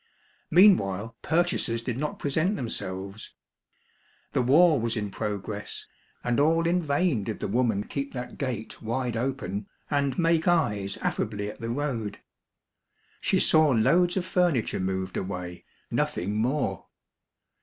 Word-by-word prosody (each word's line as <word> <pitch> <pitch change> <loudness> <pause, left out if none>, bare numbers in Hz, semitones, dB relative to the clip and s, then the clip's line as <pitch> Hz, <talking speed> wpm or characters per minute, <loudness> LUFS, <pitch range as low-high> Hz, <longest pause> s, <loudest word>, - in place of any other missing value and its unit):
Meanwhile 115 - +4
purchasers 160 -8 +1
did 115 0 -3
not 150 +1 -2
present 155 +8 0
them 125 - -3
selves. 95 +3 -5 1.0
The - - +2
war 150 +4 +5
was 115 0 -1
in 105 -2 -3
progress, 105 0 -4 0.4
and 120 +1 +1
all 165 +3 +3
in 175 +2 +2
vain 145 - +1
did 110 0 -4
the - - -2
woman 110 -2 +1
keep 140 +4 -4
that 125 -1 -6
gate 120 -6 -4
wide 120 +1 -2
open, 115 -5 -3 0.2
and 140 -2 +1
make 165 -1 +2
eyes 105 - +1
affably 105 -1 -2
at - - -15
the 115 - -3
road. 120 -5 -2 1.0
She - - +2
saw 155 -1 +5
loads 175 - +3
of 185 - 0
furniture 175 -10 +1
moved 95 0 -2
away, 90 -2 -5 0.3
nothing 100 +4 -1
more. 115 - -1
120 Hz, 135 wpm, -27 LUFS, 105-155 Hz, 1.0 s, war